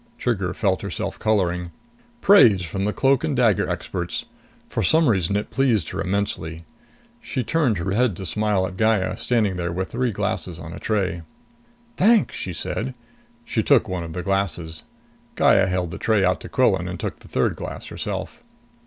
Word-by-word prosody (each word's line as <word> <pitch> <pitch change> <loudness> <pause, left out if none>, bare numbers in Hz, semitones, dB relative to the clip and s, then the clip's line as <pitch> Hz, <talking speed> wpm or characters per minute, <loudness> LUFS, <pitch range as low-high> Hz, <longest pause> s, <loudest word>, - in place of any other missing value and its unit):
Trigger 95 -7 -1
felt 95 0 0
herself 100 0 -4
coloring. 90 -5 +1 0.5
Praise 115 - +6
from 95 +4 -3
the 105 - +1
cloak 135 +3 +2
and 145 - 0
dagger 115 -6 +3
experts! - - -3 0.4
For - - -2
some 160 -1 +4
reason 100 -4 +2
it 105 - -2
pleased 120 - +1
her 95 - -4
immensely. 90 -4 -2 0.6
She 130 - -3
turned 135 - +1
her 85 +2 -2
head 115 -1 +2
to 95 - -6
smile 100 +2 +1
at 95 0 -7
Gaya, 110 -4 +2
standing 105 -6 0
there 85 -1 -2
with 95 +2 -3
three 125 0 0
glasses 95 -4 -3
on 80 0 -8
a - - -8
tray. 95 -6 -1 0.8
"Thanks!" 205 - +4
she 95 - -4
said. 120 +9 -3 0.5
She 235 - 0
took 140 -7 +4
one 90 -3 -3
of 80 -1 -7
the 90 +1 -4
glasses. 90 -4 -1 0.5
Gaya 95 -1 +4
held 90 -2 -1
the - - -7
tray 110 -4 +2
out 90 0 +2
to - - -8
Quillan - - +2
and - - -5
took - - -4
the - - -16
third - - 0
glass - - -7
herself. 105 - -5
100 Hz, 180 wpm, -23 LUFS, 90-115 Hz, 0.8 s, Praise